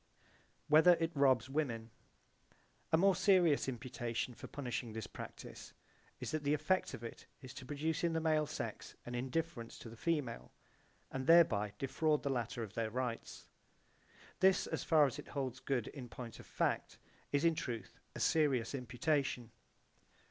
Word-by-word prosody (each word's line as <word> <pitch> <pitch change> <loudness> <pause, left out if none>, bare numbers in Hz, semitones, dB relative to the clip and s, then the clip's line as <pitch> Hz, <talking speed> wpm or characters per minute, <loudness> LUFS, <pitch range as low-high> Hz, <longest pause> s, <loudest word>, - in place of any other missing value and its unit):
Whether 160 +4 +7
it 165 0 0
robs 130 -4 +4
women 125 -6 -2 1.0
A 160 - +6
more 195 +2 +5
serious 175 -8 +4
imputation 120 -1 -3
for - - -9
punishing 125 -4 -4
this 110 -2 -4
practise - - -9 0.5
[is] - - -4
that 155 -1 -2
the 145 +1 +3
effect 155 +5 0
of 115 - -11
it 115 - -8 0.2
is 130 - -8
to 130 -3 -9
produce 155 +4 -1
in 170 -1 +2
the 165 - +1
male 155 -2 +2
sex - - -5
an 120 - -6
indifference 130 0 -3
to 115 - -9
the 115 - -10
female, 145 -3 -2 0.6
and 130 0 -4
thereby 110 -12 +5
defraud 150 +3 +1
the 140 - 0
latter 120 -1 -2
of 105 -2 -8
their 115 -1 -1
rights. 120 0 -4 0.9
This, 190 0 +5
as - - -3
far 155 -3 +5
as 140 +1 -3
it - - -9
holds 130 -3 -3
good 125 -5 -1
in 130 -4 -8
point 120 -1 -8
of - - -12
fact, - - -1 0.3
is 145 +3 +2
in 165 - +5
truth 115 -10 -5 0.2
a - - -5
serious 140 -7 +2
imputation. 125 -1 -1
135 Hz, 165 wpm, -36 LUFS, 120-155 Hz, 1.0 s, Whether